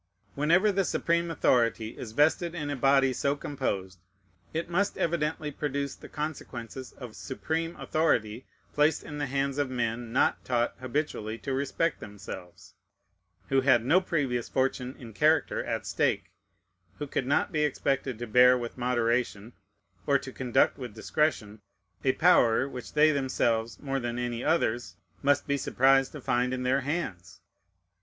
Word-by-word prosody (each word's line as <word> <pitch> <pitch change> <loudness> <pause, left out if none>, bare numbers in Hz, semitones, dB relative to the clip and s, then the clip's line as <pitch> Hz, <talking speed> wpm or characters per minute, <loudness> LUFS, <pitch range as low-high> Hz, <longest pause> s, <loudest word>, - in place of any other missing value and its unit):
Whenever 170 +8 +3
the 195 0 +1
supreme 170 -1 0
authority 115 -7 +1
is 110 - -7
vested 160 +5 +2
in 150 -3 -3
a - - -1
body 135 0 +3
so 140 +2 0
composed, 100 -11 -4 0.5
it 165 +1 -3
must 195 +4 0
evidently 155 -2 -1
produce 140 -1 -3
the - - -13
consequences 130 -5 -6
of 125 -5 -10
supreme 165 +5 -3
authority 120 -7 0 0.3
placed 150 +1 +2
in 150 -1 -7
the 145 - -1
hands 140 +1 -1
of 145 -2 0
men 120 -2 -2
not 125 - +2
taught 120 -1 0
habitually 130 -4 -3
to 135 +3 -4
respect 140 +5 -1
themselves, 100 -4 -10 0.8
who 135 0 +3
had 125 -3 +4
no 175 +8 +5
previous 135 -10 -1
fortune 130 -1 -1
in 115 -3 -11
character 155 +6 +2
at - - -3
stake, - - 0 0.7
who 145 - -4
could 135 -2 -2
not 145 - +1
be 155 - 0
expected 135 -3 -1
to 120 - -5
bear 125 +3 +6
with 120 +1 -6
moderation 120 -2 0 0.5
or 140 - +5
to 130 -1 -8
conduct 130 +1 +1
with 120 -5 -7
discretion 110 -5 -1 0.4
a 130 - +3
power 130 -8 +4
which 125 -3 -8
they 155 +1 +5
themselves, 120 -5 0
more 135 -1 -2
than 120 -1 -3
any 120 -1 -3
others, 120 -7 0 0.3
must 145 0 +2
be 140 -1 0
surprised 135 0 +3
to 150 - -8
find 125 0 0
in 125 - -4
their 130 +2 +2
hands. 135 - -4
135 Hz, 155 wpm, -28 LUFS, 120-150 Hz, 0.8 s, bear